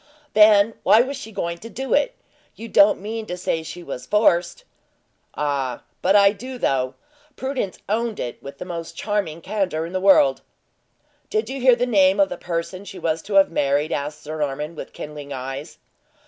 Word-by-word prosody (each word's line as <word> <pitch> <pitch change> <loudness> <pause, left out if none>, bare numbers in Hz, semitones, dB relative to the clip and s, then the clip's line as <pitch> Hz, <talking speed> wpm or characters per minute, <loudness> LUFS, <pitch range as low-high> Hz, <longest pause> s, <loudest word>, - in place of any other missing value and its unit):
"Then 210 0 +6
why 220 - +6
was 275 +2 -4
she 225 -5 -8
going 170 -4 -3
to 230 - -9
do 265 +3 -3
it? - - +2 0.4
You 230 - -8
don't 205 -2 +5
mean 220 +2 -5
to 180 - -4
say 165 -2 -1
she 175 +2 -8
was 125 -4 -7
forced?" 180 -5 +2 0.7
"Ah, 140 -4 -2 0.2
but 190 +2 +3
I 200 -1 +7
do, 255 +5 -8
though! 130 - 0 0.4
Prudence 260 -8 -3
owned 225 +1 -1
it 120 - -5
with 140 0 -9
the - - -7
most 170 -2 -6
charming 200 -7 -2
candor 185 -4 -1
in 170 - -8
the 185 - -1
world." 165 -9 +5 0.9
"Did 435 0 -1
you 270 0 -5
hear 255 -1 +6
the 245 - 0
name 195 -4 +4
of 195 -1 +4
the - - -4
person 175 +2 -4
she 200 -1 -10
was 160 0 -1
to 200 +3 -5
have 195 -2 +6
married?" 145 0 +1
asked 150 +1 -3
Sir 155 +1 -6
Norman, 150 +2 -2
with - - -8
kindling 145 -1 -8
eyes. 135 +4 -6
185 Hz, 190 wpm, -22 LUFS, 150-215 Hz, 0.9 s, I